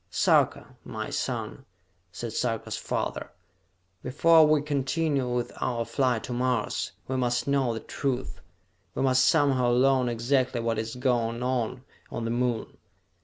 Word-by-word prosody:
"Sarka, - - +2
my - - -6
son," - - -3 0.5
said - - -6
Sarka's - - -2
father, - - -3 0.7
"before 160 +4 +5
we 150 -1 +3
continue 145 -1 0
with 120 -1 -1
our 115 -2 -1
flight 125 -5 0
to 125 - -5
Mars, 125 -2 -1
we 130 - -2
must 120 0 0
know 140 -3 +2
the 110 -1 -4
truth! 130 -2 -3 0.5
We - - 0
must 130 -1 +4
somehow 135 -4 +3
learn 130 0 +3
exactly 125 +1 0
what 115 -1 -1
is 115 +1 -4
going 120 -2 0
on 125 -1 -1 0.3
on 120 - -4
the 115 - -1
Moon! 120 -1 -2
125 Hz, 140 wpm, -27 LUFS, 120-135 Hz, 0.7 s, before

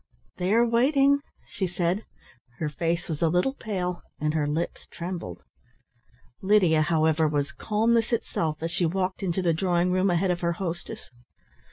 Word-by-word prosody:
"They 180 +2 -1
are 230 +2 +5
waiting," 275 +4 +4 0.3
she 190 -2 -2
said. 175 +3 -1 0.5
Her 155 - -2
face 170 +2 -2
was 155 -3 -4
a 165 - +4
little 180 +11 +1
pale 180 -8 -3 0.2
and 150 0 0
her 150 -2 0
lips 160 +4 -3
trembled. 170 - -6 1.0
Lydia, 190 -6 +4
however, 160 0 +2
was 145 -1 -1
calmness 225 +7 +1
itself, 160 -9 -1
as 165 - -2
she 175 -1 +1
walked 185 +3 -2
into 185 -1 -1
the 170 -2 +3
drawing 175 +1 +1
room 185 +1 +2
ahead 180 +1 +2
of 175 - -2
her 170 0 +1
hostess. 175 -5 -6
175 Hz, 160 wpm, -26 LUFS, 160-195 Hz, 1.0 s, are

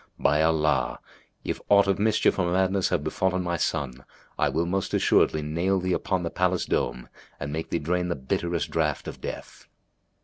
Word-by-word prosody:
By 75 +1 +2
Allah, 80 -2 +2 0.5
if - - -3
aught 100 -1 +6
of 100 -1 +1
mischief 110 -1 +2
or 85 -2 +1
madness 95 +1 +2
have - - 0
befallen 95 -1 0
my 85 -1 -1
son 65 -5 -2 0.3
I - - +1
will 80 +5 0
most 95 +2 -1
assuredly 75 - +3
nail 85 +6 0
thee 90 0 -1
upon 95 0 -1
the 85 - -3
palace 90 0 +1
dome - - -1 0.3
and 70 +1 -4
make 80 +1 -4
thee - - 0
drain 90 +3 -1
the 85 - -1
bitterest 80 +4 -2
draught 75 -3 -1
of - - -8
death!'' - - -8
85 Hz, 180 wpm, -26 LUFS, 75-95 Hz, 0.5 s, aught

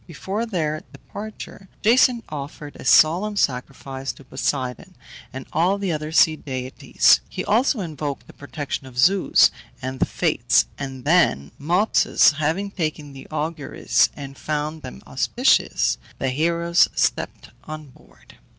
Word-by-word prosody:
Before 195 +7 -4
their 155 -7 -2
departure 205 -2 -10
Jason 240 +1 +4
offered 145 0 -7
a - - -11
solemn 180 +10 +4
sacrifice 135 -1 -2
to - - -16
Poseidon 130 -1 -3 0.4
and 130 0 -7
all 180 +5 +2
the 200 -3 -2
other 155 0 -3
sea 160 0 +5
deities; 130 -3 +1
he - - -5
also 235 +1 +2
invoked 150 -5 -5
the - - -15
protection 140 -1 -6
of 125 -1 -13
Zeus 180 +8 +5 0.3
and 130 0 -5
the - - +2
Fates, - - +2
and 135 -2 -6
then, 110 - +3
Mopsus 175 -1 +3
having 170 +7 -1
taken 155 -5 -4
the 135 -1 -11
auguries, 155 -1 0
and 140 -2 -9
found 155 +1 -3
them 65 - -10
auspicious, - - +1 0.2
the 135 - -1
heroes 170 +5 +2
stepped - - -1
on 155 -2 -8
board. - - -21
155 Hz, 135 wpm, -22 LUFS, 135-175 Hz, 0.4 s, sea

